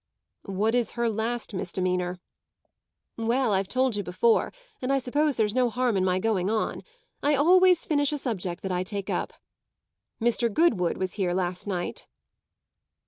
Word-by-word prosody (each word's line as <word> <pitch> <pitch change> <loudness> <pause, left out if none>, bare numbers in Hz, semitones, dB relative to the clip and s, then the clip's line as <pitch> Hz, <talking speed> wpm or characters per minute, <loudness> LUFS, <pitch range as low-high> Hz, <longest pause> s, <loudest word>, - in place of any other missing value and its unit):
"What 205 +4 0
is 245 -2 0
her 235 0 0
last 225 +1 -2
misdemeanour?" 180 -1 -2 1.0
"Well, 230 0 +1
I've 190 0 +1
told 255 0 +1
you 205 - -1
before, 190 +5 +2 0.3
and 255 +1 -1
I 275 - +3
suppose 285 +3 0
there's 215 -2 +1
no 250 -1 +2
harm 245 -1 0
in 190 - +2
my 185 -1 +2
going 195 -2 0
on. 220 0 -1 0.4
I 290 +1 +3
always 360 +4 +5
finish 290 -2 +1
a 295 - -1
subject 190 - -4
that 190 - -2
I 180 0 0
take 200 +1 -4
up. - - -2 0.9
Mr. 235 0 +1
Goodwood 205 - +2
was 185 -1 -2
here 180 -1 +1
last 180 +1 -2
night." 180 -3 -4
220 Hz, 160 wpm, -26 LUFS, 185-255 Hz, 1.0 s, always